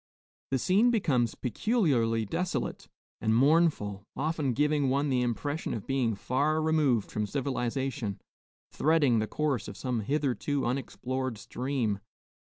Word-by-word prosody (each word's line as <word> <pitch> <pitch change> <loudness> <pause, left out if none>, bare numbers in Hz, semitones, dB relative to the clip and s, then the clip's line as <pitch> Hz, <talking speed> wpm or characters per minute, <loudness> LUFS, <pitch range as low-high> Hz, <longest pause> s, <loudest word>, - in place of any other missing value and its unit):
The 135 - +1
scene 195 - +3
becomes 135 - +1
peculiarly 125 - +1
desolate 155 - -3 0.3
and 110 0 +2
mournful, 135 - +3
often 150 -3 0
giving 150 0 +2
one 140 +2 +1
the 130 -2 +2
impression 145 +6 -2
of 110 - -6
being 130 -5 0
far 145 +9 0
removed 150 -8 +2
from 105 -1 -1
civilization, 125 -5 -2 0.5
threading 145 -7 +3
the 110 - -1
course 140 -8 -1
of 100 -1 -8
some 125 -3 -2
hitherto 140 +3 -1
unexplored 130 -1 -2
stream. 120 -3 -2
130 Hz, 125 wpm, -29 LUFS, 115-150 Hz, 0.5 s, scene